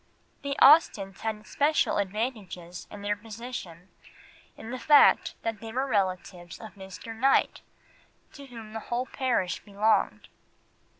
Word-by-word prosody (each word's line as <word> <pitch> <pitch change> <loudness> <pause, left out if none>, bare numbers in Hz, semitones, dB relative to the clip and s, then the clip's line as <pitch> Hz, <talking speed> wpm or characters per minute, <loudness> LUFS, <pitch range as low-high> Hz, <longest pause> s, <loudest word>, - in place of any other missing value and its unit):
The 280 0 -3
Austens 205 - +5
had 215 -1 -4
special 295 +2 +1
advantages 200 -4 -4
in 205 -1 -10
their 205 0 0
position 210 -5 -9 0.7
in 225 - -9
the 255 - -5
fact 295 +1 +5
that 225 -2 -3
they 225 +1 -8
were 260 +4 -1
relatives 185 -6 -2
of 220 - -10
Mr. 195 +3 -9
Knight, 270 +4 +2 0.7
to 280 -1 -11
whom 225 -4 -11
the 225 - -4
whole 240 +2 -1
parish 245 -10 -1
belonged. 210 +2 0
220 Hz, 130 wpm, -27 LUFS, 195-250 Hz, 0.7 s, Austens